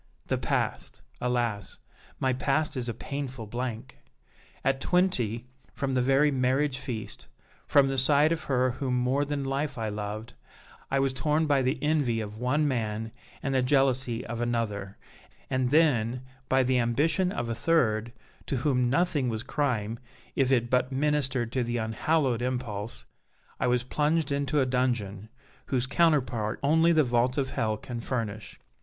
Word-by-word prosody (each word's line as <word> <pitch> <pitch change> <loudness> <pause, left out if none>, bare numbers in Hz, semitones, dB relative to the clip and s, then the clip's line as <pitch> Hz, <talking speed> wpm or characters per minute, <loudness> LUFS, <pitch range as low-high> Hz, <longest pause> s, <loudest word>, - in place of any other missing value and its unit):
The - - 0
past! - - -2 0.2
alas! 120 -5 -1 0.4
my 130 -1 +1
past 145 +4 0
is 125 -2 -2
a - - -2
painful 130 -2 -5
blank! 120 +2 -5 0.6
At 135 0 +1
twenty, 125 - +1 0.3
from 135 -1 -1
the 130 - +2
very 135 +4 +4
marriage 135 +1 +1
feast, 125 -5 -6 0.4
from 140 -1 +5
the 135 -1 0
side 145 +4 +4
of 165 -1 -2
her 130 -2 +2
whom 125 0 -1
more 130 +3 +1
than 145 -1 -2
life 140 +1 -2
I 110 -1 -2
loved, 105 +2 -5 0.6
I 135 - +1
was 135 -1 +1
torn 150 +4 +1
by 140 -3 +3
the 130 +3 0
envy 145 -7 +1
of 105 -1 -5
one 145 +5 +1
man 110 -4 -2 0.3
and 135 - -1
the 130 - +3
jealousy 130 -2 +2
of 120 0 -4
another, 105 -5 -2 0.5
and 130 -1 +1
then, 125 -5 +3 0.3
by 130 0 +4
the 130 0 +2
ambition 150 +10 +1
of 120 -8 -3
a 115 - -1
third, 115 -4 +1 0.4
to - - -1
whom 125 -2 +1
nothing 145 -3 +1
was 110 0 -3
crime 115 -6 -1 0.4
if 135 -1 +2
it 120 -3 +3
but 125 +1 +2
ministered 135 -4 0
to 130 0 0
that 120 0 -2
unhallowed 120 +3 0
impulse, 120 -4 -3 0.5
I - - +1
was 125 0 +2
plunged 150 +3 0
into 140 +1 +1
a - - +3
dungeon, 120 -6 -1 0.4
whose 130 -2 0
counterpart 130 -8 +1
only 160 +4 +4
the 160 -2 +5
vaults 125 +1 +1
of 135 -2 0
hell 110 -1 0
can 120 +2 -6
furnish. 110 -3 -4
130 Hz, 160 wpm, -28 LUFS, 115-140 Hz, 0.6 s, from